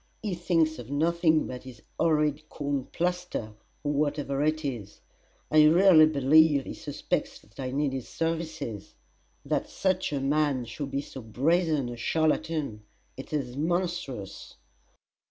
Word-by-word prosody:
"He 205 -3 -1
thinks 165 -3 +1
of 120 0 -9
nothing 160 +2 +2
but 125 -1 -6
his 125 -4 -12 0.2
horrid 155 -2 +1
corn 140 -3 -2
plaster, 180 -11 -3 0.3
or 145 0 0
whatever 145 -1 -1
it 155 0 0
is! 115 -7 -5 0.5
I 155 0 +7
really 165 0 +7
believe 150 0 +4
he - - -6
suspects - - -3
that 105 - -22
I 130 -1 -3
need 140 +1 0
his 130 -2 -5
services. 160 - -4 0.5
That - - -1
such 185 -2 0
a 140 - -1
man 140 -2 +1
should 135 +5 -6
be 140 - -2
so 135 - -9
brazen 150 +5 +1
a 120 - -7
charlatan 155 -4 0 0.3
it 135 - -9
is 135 -5 -2
monstrous!" 160 - -3
150 Hz, 140 wpm, -28 LUFS, 135-160 Hz, 0.5 s, I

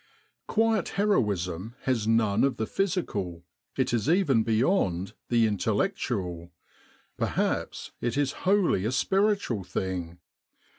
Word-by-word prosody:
' - - -48
'Quiet" 225 -3 +1
heroism 105 - 0
has 120 -5 0
none 110 -3 +3
of 135 -1 +1
the 110 - -1
physical, 105 - -2 0.3
it 130 -2 +1
is 115 +2 +1
even 160 - +3
beyond 110 - +1 0.2
the 115 -1 +4
intellectual, 100 - -1 0.7
perhaps - - -1
it 120 +2 -1
is 145 -2 +1 0.2
wholly 190 - +3
a 110 - 0
spiritual 195 - +1
thing. 90 -2 -4
115 Hz, 115 wpm, -27 LUFS, -, 0.7 s, the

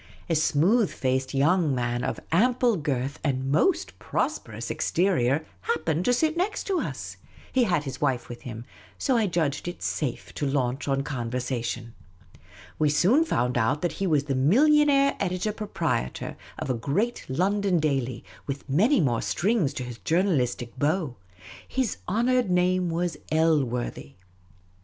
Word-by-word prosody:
A - - +4
smooth 170 +8 +3
faced 130 +1 -1
young 155 +1 +3
man 120 0 -1
of - - -2
ample 240 +5 +3
girth 140 -3 -2
and 135 -2 -1
most 340 - +1
prosperous - - -3
exterior 155 -5 +1 0.2
happened 160 - -1
to 245 - +4
sit 315 +5 +1
next 395 +3 -1
us. 370 - -3 0.3
He 255 -2 +3
had 175 -7 +1
his 135 -2 -6
wife 130 -5 0
with 120 0 -9
him, 115 -1 -7 0.3
so 265 - +1
I 225 -3 +3
judged 160 -4 -1
it 175 - -6
safe 135 -6 -3
to 145 - -2
launch 135 -1 -1
on 135 0 +1
conversa 125 -1 -3
tion. 120 -1 -4 0.9
We 150 - +3
soon 190 - +4
found 125 - 0
out 115 +8 +1
that 175 - +1
he 195 - +2
was 150 -4 +2
the 140 -1 -2
millionaire 275 - +4
editor 185 +4 -1
proprietor 205 - -3 0.2
of 130 - -2
a - - +1
great 175 - -1
London 190 +5 +1
daily, 135 -5 -1 0.2
with 140 +1 -5
many 210 - +3
more 120 -7 +1
strings 195 - +1
to 130 - -3
his 120 -2 -8
journalistic 130 - 0
bow; 150 -3 0 0.5
his 260 -5 -1
honoured 240 +3 +2
name 180 0 +2
was 170 +1 -1
Elworthy. 140 - 0
155 Hz, 150 wpm, -26 LUFS, 130-200 Hz, 0.9 s, A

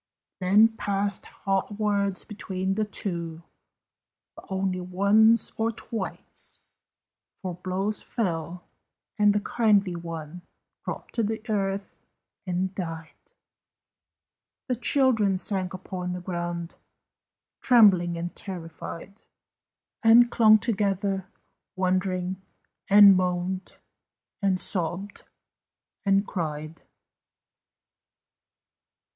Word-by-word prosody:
Then 205 +4 +5
passed 200 0 -2
hot 195 +1 -2
words 200 -2 -1
between 190 -3 -3
the 215 +2 0
two, 170 -5 -3 0.9
But - - -13
only 190 -1 -1
once 200 +5 +4
or 225 +1 +1
twice, 230 0 -7 0.7
For 185 -2 -6
blows 185 +4 -3
fell, 175 -5 -3 0.6
and 210 0 +5
the 210 - +1
kindly 205 -4 +2
one 165 0 -7 0.4
Dropped - - -7
to 230 - 0
the 220 +1 -2
earth 195 -1 -2 0.5
and 185 +1 -1
died; 165 -4 -6 1.5
The 255 - 0
children 240 -6 +3
sank 190 -1 -1
upon 180 -1 -5
the 180 - -4
ground, 175 -1 -4 0.9
Trembling 190 -8 +5
and 175 +1 -5
terrified, 180 +2 -8 0.8
And 235 +1 +6
clung 215 -2 +6
together, 200 -3 -1 0.5
wondering, 185 0 -1 0.5
And 200 -1 +9
moaned, 180 +1 -2 0.6
and 190 -2 +1
sobbed, 185 +3 -3 0.8
and 195 0 +3
cried. 155 -4 -5
190 Hz, 90 wpm, -26 LUFS, 180-205 Hz, 1.5 s, And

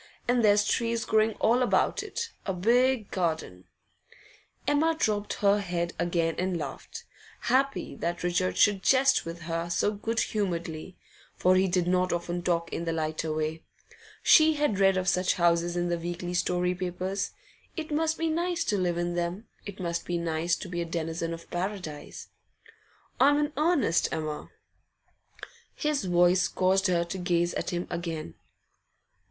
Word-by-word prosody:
And 245 -1 +2
there's 205 -1 +5
trees 230 -1 0
growing 220 0 +2
all 240 +4 +2
about 250 - +2
it; 465 -1 -5 0.2
a 190 - 0
big 235 +4 +2
garden 160 - -2 0.5
' - - -27
Emma 315 +3 +3
dropped 210 -7 0
her 200 0 +3
head 175 -3 -2
again 170 -1 +1
and 185 -1 0
laughed, 145 -4 -7 0.4
happy 265 +3 0
that 175 +1 -3
Richard 175 +1 0
should 205 -2 +4
jest 265 +5 +4
with 165 0 -6
her 165 +1 -3
so 175 +4 +1
good 225 +2 -2
humouredly; 175 -4 -3 0.4
for 185 +1 +3
he 190 +1 +3
did 180 -1 +1
not 180 0 +1
often 175 0 -2
talk 170 -1 -1
in 170 - -3
the 165 - -1
lighter 155 0 -2
way. 155 +1 -2 0.6
She 315 -1 +6
had 290 -10 0
read 195 -1 +4
of 185 0 -1
such 180 0 +2
houses 170 0 +2
in 175 0 0
the 170 -1 -1
weekly 175 +1 -4
story 180 0 +1
papers. 185 +2 -3 0.5
It 315 -1 -5
must 315 +1 +1
be 330 - 0
nice 340 +1 0
to 210 -9 0
live 175 -2 0
in 175 0 -1
them; 175 +5 -3 0.2
it 200 0 -8
must 170 -2 -3
be 175 - -1
nice 170 +1 0
to - - -8
be 175 -1 -3
a - - -2
denizen 165 0 -3
of 165 0 -7
Paradise. 180 -4 -5 0.9
'I'm 285 +2 +5
in 295 0 0
earnest, 300 - +2
Emma.' 155 -1 -4 1.3
His 300 -6 -1
voice 180 +1 +4
caused 190 +2 +2
her 175 -2 +2
to 180 +2 -6
gaze 175 -1 +1
at - - -3
him 175 0 -2
again. 165 - -4
180 Hz, 165 wpm, -28 LUFS, 170-215 Hz, 1.3 s, She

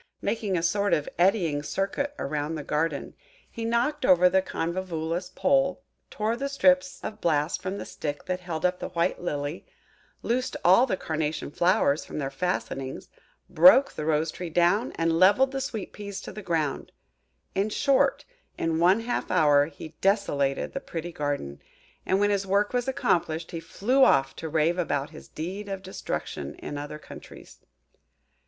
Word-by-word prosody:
Making 205 -5 -1
a 165 - -2
sort 200 +3 +2
of 150 - -3
eddying 175 -6 +2
circuit 200 - -2
round 150 +2 -3
the 150 - -5
garden, 150 0 -2 0.4
he 230 - -6
knocked 240 +6 0
over 180 -5 +6
the 190 +1 +3
Convolvulus 170 -1 -3
pole, 275 +5 +1 0.3
tore 220 +2 -1
the 275 +3 -3
strips 185 -8 +2
of 215 0 -6
bast 150 -1 +1
from 190 +2 -4
the - - -6
stick 145 -1 -5
that 185 0 -2
held 175 -2 -4
up 180 0 +1
the - - -5
white 175 0 -1
Lily, 145 -2 -3 0.6
loosed 250 +2 -1
all 190 +9 +6
the 190 - -1
Carnation 155 -3 -3
flowers 175 -4 +2
from - - -8
their 135 -2 -2
fastenings, 135 -4 -3 0.4
broke 275 0 +6
the - - -5
Rose 155 +1 +1
tree 180 +1 -6
down, 175 +8 +2
and 165 0 0
levelled 205 +9 +5
the 270 0 -3
Sweet 225 -6 -5
peas 200 -1 -6
to - - -8
the 210 - -8
ground. 160 -6 -2 0.6
In 195 +2 0
short, 275 +4 +2 0.3
in 165 -1 0
one 185 +6 +4
half 240 +1 -2
hour 145 -2 +4
he 160 0 -10
desolated 145 -9 +1
the 275 - -2
pretty 175 - -6
garden; 145 - -3 0.5
and 190 - +2
when 205 0 +3
his 195 -1 0
work 200 +3 +1
was 245 0 0
accomplished, 170 -10 0
he 165 - -4
flew 250 +10 +1
off 135 - +4
to 160 - -5
rave 165 +3 +1
about 145 -3 -1
his 155 - -12
deed 190 +6 -6
of 195 -1 -5
destruction 75 - -5
in - - -7
other 145 +1 -6
countries. 150 - -13
180 Hz, 170 wpm, -26 LUFS, 155-205 Hz, 0.6 s, over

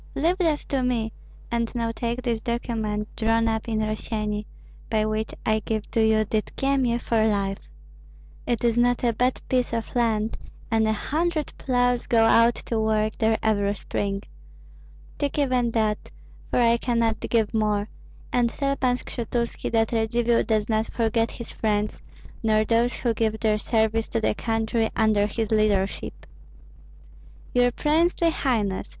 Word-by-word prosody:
"Leave 340 +6 +1
that 320 -4 +2
to 270 -2 0
me, 235 -3 -1 0.4
and 235 0 -1
now 230 -1 0
take 235 +2 -3
this 235 -2 -1
document, 220 -3 -2
drawn 225 0 +2
up 225 +1 -1
in 220 -1 0
Rossyeni, 215 -1 -2 0.4
by 215 -1 +1
which 215 0 -2
I 215 0 +2
give 215 0 -3
you 220 -1 +3
Dydkyemie 240 +3 0
for 230 -2 +1
life. 195 -2 -2 0.8
It 240 -1 0
is 235 0 +2
not 245 0 +2
a 235 -1 +2
bad 250 +3 +1
piece 250 -2 0
of 230 +1 -3
land, 225 -2 0 0.3
and 220 -1 +3
a - - +2
hundred 310 +7 -1
ploughs 245 -2 +1
go 225 -1 +4
out 230 +1 +5
to 230 - -1
work 215 0 +1
there 220 -1 +3
every 205 -2 +1
spring. 200 -1 -3 1.0
Take 285 0 -1
even 255 -4 +2
that, 215 -1 0 0.4
for - - 0
I 235 -1 +4
cannot 230 -2 0
give 225 -2 0
more, 210 -2 +1 0.5
and 240 -1 +3
tell 275 +2 -1
Pan 250 -2 +1
Skshetuski 235 -1 -3
that 225 -1 +2
Radzivill 235 +1 +1
does 215 -2 +1
not 220 0 +1
forget 230 0 +1
his 235 - -8
friends, 210 -1 -1 0.4
nor 215 -1 +2
those 235 +2 +2
who 235 -2 0
give 220 -1 -1
their 215 -1 +1
service 220 0 +1
to 230 - -1
the 220 - +1
country 225 +1 0
under 215 -2 +3
his 220 +1 -3
leadership." 210 -3 0 1.3
"Your 245 0 +4
princely 330 +5 +2
highness!" 215 -11 -1
225 Hz, 155 wpm, -25 LUFS, 215-240 Hz, 1.3 s, out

